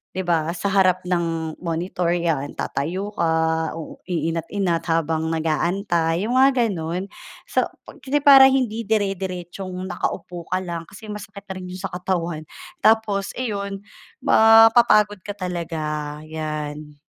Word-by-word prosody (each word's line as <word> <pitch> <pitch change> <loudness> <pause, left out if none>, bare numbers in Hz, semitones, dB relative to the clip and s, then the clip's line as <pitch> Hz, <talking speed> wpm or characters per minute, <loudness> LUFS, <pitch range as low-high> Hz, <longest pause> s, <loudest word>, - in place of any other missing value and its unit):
'di - - -2
ba 165 -1 +1
sa 200 - -2
harap 185 -2 +3
ng 165 -3 -1
monitor 170 +1 -1
'yan, 165 -5 0
tatayo 180 +8 -2
ka, 160 -1 +1
uu 160 - -8
inat-inat 170 +2 -1
habang 160 0 0
nag-aantay, 165 +2 0
'yong 245 - -1
mga 270 +1 +6 0.2
gano'n. 175 +1 -3 0.4
So - - +1 0.2
pag - - -13
kasi 290 +2 +1
para 270 -2 +9
hindi 230 -4 0
dire-diretsong 190 -3 -2
nakaupo 175 -1 -4
ka 185 - +2
lang 170 -2 -5
kasi 215 +2 -12
masakit 200 -1 -8
na 190 - -6
rin 185 -1 -7
'yong 185 +1 -8
sa - - -20
katawan, 175 -4 -2 0.4
tapos 215 -3 +3
iyon, 200 -5 -3 0.4
mapapagod 225 -3 +6
ka 205 - -5
talaga, 155 -5 -4
'yan. 150 -1 -5
180 Hz, 135 wpm, -22 LUFS, 160-200 Hz, 0.4 s, para